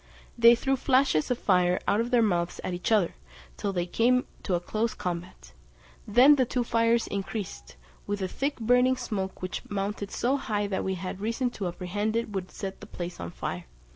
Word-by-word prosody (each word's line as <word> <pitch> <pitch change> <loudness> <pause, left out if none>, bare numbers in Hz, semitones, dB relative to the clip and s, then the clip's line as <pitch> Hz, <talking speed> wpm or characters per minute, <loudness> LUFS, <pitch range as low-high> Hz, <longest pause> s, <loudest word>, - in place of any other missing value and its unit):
They 235 0 +7
threw 270 +3 0
flashes 255 - +2
of 250 - +1
fire 180 -3 +2
out 210 - +3
of 235 - -2
their 245 -2 +4
mouths 175 -4 0
at 185 - -3
each 175 +5 -3
other, 205 -6 +3 0.4
till 200 - -2
they 175 -2 -1
came 245 +7 +2 0.2
to 180 -3 0
close 215 +5 -2
combat; 175 - -5 0.6
then 255 +7 +7
the 260 - +4
two 245 0 -1
fires 230 0 +2
increased, 195 - -5 0.3
with 205 -1 -2
a - - 0
thick 280 +9 -2
burning 250 +3 +3
smoke 200 -7 -4
which 185 - -3
mounted 200 0 -3
so 260 +6 0
high 210 -6 -1
that 200 -1 -2
we 190 0 -1
had 185 +1 -6
reason 230 +3 -1
to 200 -5 -4
apprehend 195 +5 -2
it 230 -2 -1
would 190 -2 -4
set 195 -2 -6
the - - -11
palace 175 0 -6
on 85 - -5
fire. - - -5
205 Hz, 195 wpm, -28 LUFS, 185-235 Hz, 0.6 s, They